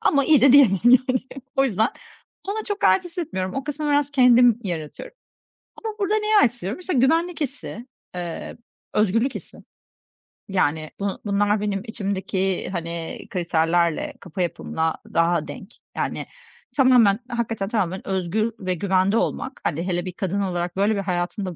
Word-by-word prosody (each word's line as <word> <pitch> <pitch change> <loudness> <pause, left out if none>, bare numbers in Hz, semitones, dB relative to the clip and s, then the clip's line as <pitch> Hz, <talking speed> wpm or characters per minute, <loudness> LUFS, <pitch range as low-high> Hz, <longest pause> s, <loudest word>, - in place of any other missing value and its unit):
ama 280 -2 +3
iyi 305 -3 +5
de 265 0 +6
diyemem, 230 -10 +6
yani. 255 +1 +5 0.4
O 270 - +4
yüzden 220 -2 +2 0.6
ona 430 +2 -2
çok 410 -1 -3
ait 375 - +4
hissetmiyorum. 315 - -4
O 270 - -3
kısmı 300 0 -4
biraz 290 -1 +2
kendim 245 -3 +5
yaratıyorum. 175 - -5 0.7
Ama 440 - -3
burada 405 0 +1
neye 425 0 +2
ait 260 - +5
hissediyorum? 235 - -5
İşte, 365 -1 -3
güvenlik 325 +6 +2
hissi, 265 -4 -5 0.3
eee, 175 -2 -5 0.4
özgürlük 225 +6 +2
hissi. - - -9 0.9
Yani, 160 -4 0
bu 200 -1 -2
bunlar 205 +1 +1
benim 200 -2 -1
içimdeki, 195 -3 -2
hani, 170 -2 -5
kriterlerle, 170 -1 0
kafa 180 +1 -6
yapımla 160 -2 -1 0.2
daha 165 -1 +2
denk. 195 +4 -9 0.2
Yani, - - -2 0.5
tamamen, 245 -6 +5
hakikaten 230 -4 -2
tamamen 190 -4 -2
özgür 195 +4 0
ve 185 -1 -1
güvende 190 +3 +2
olmak, 260 +3 -2
hani, 170 +3 -2
hele 175 0 -1
bir 185 - -4
kadın 195 +2 -2
olarak, 175 -2 -2
böyle, 205 +2 +3
bir 200 - -1
hayatında 185 +1 -2
205 Hz, 150 wpm, -23 LUFS, 180-260 Hz, 0.9 s, de